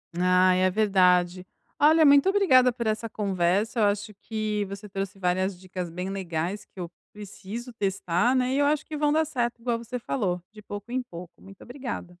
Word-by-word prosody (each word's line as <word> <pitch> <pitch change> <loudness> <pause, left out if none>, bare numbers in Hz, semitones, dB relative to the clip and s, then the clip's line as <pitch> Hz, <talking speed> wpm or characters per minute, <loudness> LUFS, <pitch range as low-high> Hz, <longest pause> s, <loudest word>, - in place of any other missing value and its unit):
Ai, 180 +1 +3
é 185 - +4
verdade. 185 -3 +2 0.3
Olha, 315 +1 +6
muito 285 +5 +6
obrigada 260 -11 +5
por 235 -2 -4
essa 220 +1 -1
conversa, 200 +3 0
eu - - +3
acho 205 +1 -1
que 215 -2 -2
você 200 +1 -8
trouxe 195 0 -5
várias 185 0 0
dicas 185 -2 -6
bem 180 +3 -5
legais 185 0 -3
que 190 - -16
eu 170 -1 -5 0.2
preciso 210 +4 -8
testar, 195 +1 0
né, 255 0 +1
e - - +1
eu 285 - +3
acho 300 +1 +1
que 310 - -7
vão 295 0 +2
dar 315 +1 +2
certo, 240 -5 -2
igual 235 -1 0
você 235 +2 -6
falou. 190 -8 -2
De 210 0 -13
pouco 205 +3 -8
em 255 +1 0
pouco. 175 -5 -10
Muito 195 0 -15
obrigada. 245 -9 -7
205 Hz, 190 wpm, -26 LUFS, 185-245 Hz, 0.3 s, Olha